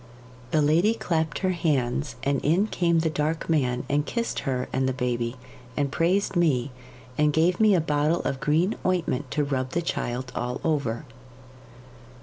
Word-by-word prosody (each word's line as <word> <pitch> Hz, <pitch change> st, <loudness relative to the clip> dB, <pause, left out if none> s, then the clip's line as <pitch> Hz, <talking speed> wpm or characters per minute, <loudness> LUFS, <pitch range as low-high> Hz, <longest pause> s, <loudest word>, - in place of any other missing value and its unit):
The 155 Hz, +2 st, +2 dB
lady 170 Hz, +10 st, +3 dB
clapped 160 Hz, -6 st, -1 dB
her 185 Hz, -, +3 dB
hands, 145 Hz, -6 st, 0 dB
and 140 Hz, -1 st, +1 dB
in 170 Hz, +7 st, +3 dB
came 170 Hz, -5 st, +1 dB
the 160 Hz, -, +1 dB
Dark 155 Hz, +1 st, -1 dB
Man 125 Hz, -6 st, +1 dB
and 145 Hz, +1 st, +1 dB
kissed 235 Hz, +9 st, -2 dB
her 125 Hz, -1 st, -1 dB
and 130 Hz, 0 st, +1 dB
the -, -, -1 dB
baby, 120 Hz, -1 st, -2 dB, 0.4 s
and 140 Hz, -2 st, 0 dB
praised 185 Hz, +5 st, +1 dB
me, 145 Hz, -7 st, +2 dB, 0.5 s
and 150 Hz, 0 st, +4 dB
gave 165 Hz, +4 st, +2 dB
me 215 Hz, -3 st, +5 dB
a 175 Hz, -, +3 dB
bottle 150 Hz, +2 st, +1 dB
of 135 Hz, -, -2 dB
green 155 Hz, +8 st, +2 dB
ointment 165 Hz, -7 st, 0 dB
to 150 Hz, +3 st, 0 dB
rub 130 Hz, -2 st, -2 dB
the 170 Hz, -, +1 dB
child 125 Hz, -5 st, -3 dB
all 125 Hz, +1 st, -2 dB
over. 140 Hz, -5 st, -1 dB
150 Hz, 165 wpm, -26 LUFS, 130-170 Hz, 0.5 s, me